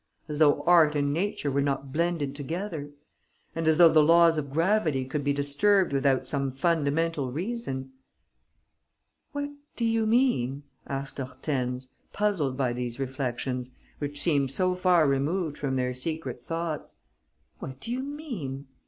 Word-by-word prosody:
As 150 -1 -4
though 150 -2 +4
art 165 -4 +5
and 145 -1 +1
nature 170 -4 -1
were 140 +1 +1
not 135 -1 -2
blended 165 -4 0
together! 160 +1 -4 0.7
And 165 -1 -1
as 160 -1 +4
though 170 -1 +9
the 155 - +7
laws 165 +1 +5
of 145 -2 -5
gravity 165 -4 +1
could 145 +2 -3
be 145 - +1
disturbed 145 +6 +2
without 135 -1 +2
some 135 +1 -1
fundamental 155 -1 0
reason!" 150 - -4 1.4
"What 285 -1 -3 0.2
do 235 - -1
you 225 -1 +1
mean?" 180 - +2 0.2
asked 135 0 -5
Hortense, 130 -1 -3 0.3
puzzled 185 -11 0
by 130 -3 0
these 120 0 -4
reflections, 130 -1 -3 0.3
which 145 0 -2
seemed 145 -4 +3
so 185 +7 +2
far 180 -4 +3
removed 150 +4 0
from 135 -2 -1
their 125 -1 0
secret 130 -2 -4
thoughts. 165 +2 -4 0.6
"What 130 0 -7
do 230 - -5
you 250 - -1
mean?" 240 - -6
145 Hz, 145 wpm, -27 LUFS, 135-175 Hz, 1.4 s, though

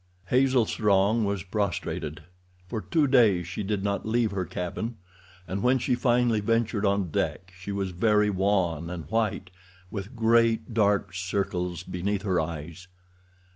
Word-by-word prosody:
Hazel 130 -2 +3
Strong 105 +1 +2
was 100 -2 -2
prostrated. 90 -6 -3 0.4
For 110 +2 -3
two 145 - +1
days 110 - +4
she 95 +4 -4
did 100 -1 -2
not 100 -1 -1
leave 115 0 +1
her 95 -2 -2
cabin, 110 +8 -4 0.5
and 95 +3 -3
when 125 +2 +3
she 125 0 0
finally 120 -2 +2
ventured 110 -1 +1
on 100 -4 0
deck 90 +4 -2
she 95 +2 -7
was 100 -1 -2
very 105 +3 +2
wan 90 -4 0
and 85 -3 -6
white, 110 -5 -1 0.4
with 100 +4 -6
great, 115 0 +2
dark 105 -3 +2
circles 90 -1 -2
beneath 95 +2 -2
her 95 -4 +1
eyes. 85 +3 -6
100 Hz, 145 wpm, -27 LUFS, 90-115 Hz, 0.5 s, days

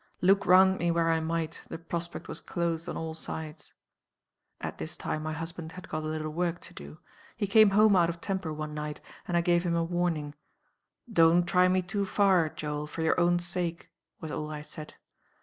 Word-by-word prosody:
Look 195 +1 +3
round 190 +1 +6
me 175 - +1
where 165 -1 +2
I 165 - +2
might, 160 0 -3
the - - -5
prospect 170 +1 -5
was - - -6
closed 170 -1 -2
on - - -4
all 160 0 -4
sides. 160 -1 -7 0.8
"At - - -6
this - - -3
time 155 - -3
my 155 0 -3
husband 165 +1 -6
had 185 +1 -10
got 155 - -2
a 155 - -4
little 155 0 -3
work 175 +1 -1
to - - -10
do. 70 +2 -10 0.4
He - - 0
came 215 +1 +6
home 210 +1 +5
out 170 -2 +4
of 170 0 -5
temper 190 -3 -3
one 155 0 -5
night, 150 0 -5 0.3
and 175 - +1
I - - +4
gave 175 0 +3
him 170 -1 -1
a 170 - +1
warning. 165 -4 -1 0.8
'Don't 170 0 +5
try 180 -1 +4
me 185 0 +2
too 200 +3 -1
far, 185 -5 +3
Joel, 150 0 -4
for 160 +2 -4
your 160 - +2
own 175 0 +4
sake,' 175 -1 -3 0.3
was 160 -2 -6
all 150 +1 -4
I 150 -1 -6
said. 155 0 -10
170 Hz, 205 wpm, -29 LUFS, 155-180 Hz, 0.8 s, round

